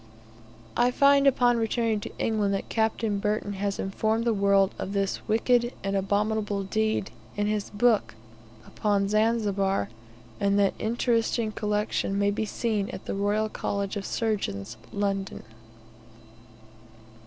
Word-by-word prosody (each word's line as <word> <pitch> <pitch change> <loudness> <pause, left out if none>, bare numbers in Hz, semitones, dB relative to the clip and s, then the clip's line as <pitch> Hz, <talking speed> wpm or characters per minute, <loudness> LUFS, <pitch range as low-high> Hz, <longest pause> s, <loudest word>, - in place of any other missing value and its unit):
I 240 +1 +4
find 280 +2 +5
upon 245 -3 +4
returning 225 -1 0
to - - -9
England, 210 -3 +1
that 195 - -5
Capt. 220 0 0 0.2
Burton 210 -1 -1
has 200 0 -2
informed 220 +4 -1
the 230 - +3
world 200 -1 +3
of 195 - -4
this 195 -1 0
"wicked 240 +2 +2
and 195 0 -1
abominable 205 +1 0
deed," 215 0 -1 0.3
in 205 - +1
his 210 -1 -1
book 215 - +2 0.5
upon 200 -2 0
Zanzibar, 205 - +1 0.5
and 200 0 +2
that 200 -1 +3
the - - -9
interesting 230 0 +1
collection 210 -2 -1
may 200 0 +2
be 220 +2 -1
seen 210 -2 -1
at - - -8
the - - -3
Royal 205 +2 +1
College 200 -1 -3
of 205 - -3
Surgeons, 120 - -2 0.2
London. 195 -1 -2
210 Hz, 135 wpm, -27 LUFS, 200-225 Hz, 0.5 s, find